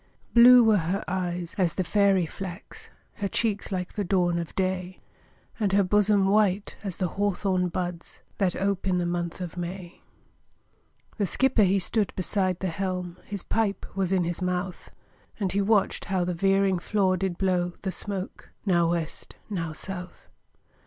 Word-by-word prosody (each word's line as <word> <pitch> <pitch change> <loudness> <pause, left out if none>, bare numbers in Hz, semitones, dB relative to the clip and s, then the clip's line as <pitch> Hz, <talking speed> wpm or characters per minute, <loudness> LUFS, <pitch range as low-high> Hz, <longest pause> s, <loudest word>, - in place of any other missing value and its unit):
Blue 245 +1 +9
were 220 -2 +5
her 180 +5 -2
eyes 175 -1 -3
as 180 -3 +2
the 185 - 0
fairy 195 0 +3
flax, 185 +3 -8 0.3
Her 200 - -1
cheeks 210 +1 -1
like 180 -2 -3
the 210 - -2
dawn 175 -2 +1
of 170 -2 -6
day, 185 -1 -2 0.6
And 200 -3 +1
her 200 0 +5
bosom 205 +1 +3
white 200 -1 +2
as 195 -4 -4
the 185 - 0
hawthorn 190 -2 0
buds, 175 -1 -5 0.2
That 190 -3 +1
ope 195 0 -1
in 185 -1 +2
the 175 - 0
month 175 0 -3
of 180 -1 -6
May. 175 0 -6 1.2
The 200 - +2
skipper 260 +3 +3
he 195 0 +4
stood 205 +2 +1
beside 185 -1 -1
the 190 - 0
helm, 180 0 -3
His 200 -2 -5
pipe 215 -3 -1
was 190 -2 0
in 185 -2 +2
his 175 +1 -3
mouth, 180 0 -3 0.5
And 195 -3 0
he 200 - +1
watched 200 0 +1
how 190 -2 0
the 180 - -1
veering 195 +1 +2
flaw 190 -1 +1
did 185 -1 -2
blow 180 -2 0
The 190 - -1
smoke 195 0 -5 0.2
now 170 -4 +3
West, 165 -2 -4 0.2
now 165 -5 -2
South. 180 +3 -7
185 Hz, 165 wpm, -26 LUFS, 180-200 Hz, 1.2 s, Blue